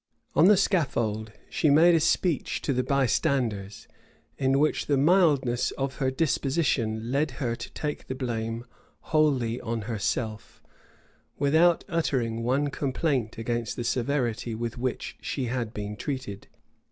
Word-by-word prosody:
On 165 - +6
the 205 -1 +7
scaffold 115 - 0 0.2
she 155 - +1
made 165 +5 +6
a 165 - +4
speech 170 0 0
to 140 - 0
the 125 - +1
bystanders; 125 -6 0 0.5
in 135 0 +2
which 150 +2 +1
the 145 - +2
mildness 145 -6 +3
of 135 0 -3
her 135 -2 +1
disposition 130 -6 0
led 145 +3 +1
her 120 -4 -1
to 115 - -8
take 150 -1 -4
the 130 - -4
blame 115 -2 -3 0.5
wholly 130 -7 +2
on 115 -1 -3
herself, 110 0 -3 0.7
without 160 +4 +4
uttering 125 -9 -1
one 135 +5 +1
complaint 135 -5 -1
against 115 0 -2
the 120 - -3
severity 120 -2 -1
with 115 0 -4
which 125 0 -3
she 135 - -3
had 120 -2 -2
been 105 -1 -5
treated. 130 -6 -5
130 Hz, 140 wpm, -27 LUFS, 115-145 Hz, 0.7 s, the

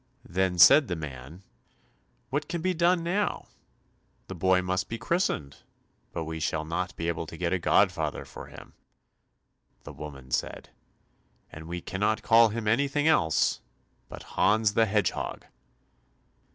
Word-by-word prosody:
Then 95 0 0
said 130 - +8
the 90 - -2
man, 75 +3 -9 0.9
"What 145 +2 -2
can 170 -2 -3
be 185 0 +1
done 175 0 +2
now? 195 +5 -1 0.8
The - - -5
boy 95 +1 +2
must 95 +1 -2
be 115 - -4
christened, 115 - -1 0.5
but 80 - -4
we 80 0 -5
shall 80 0 -2
not 90 +4 -3
be 85 - -4
able 85 -1 -3
to 80 - -9
get 85 +1 -1
a 95 - 0
godfather - - +1
for - - -10
him." - - -13 1.1
The - - -10
woman 70 -4 -10
said, - - -3 0.8
"And 80 +1 -10
we 85 +1 -5
cannot 105 +5 -1
call 115 0 +6
him 110 0 -4
anything 140 +6 +1
else 85 - +2 0.5
but - - -9
Hans 110 0 +2
the 110 +1 +3
Hedgehog." 105 0 -1
95 Hz, 145 wpm, -27 LUFS, 80-115 Hz, 1.1 s, said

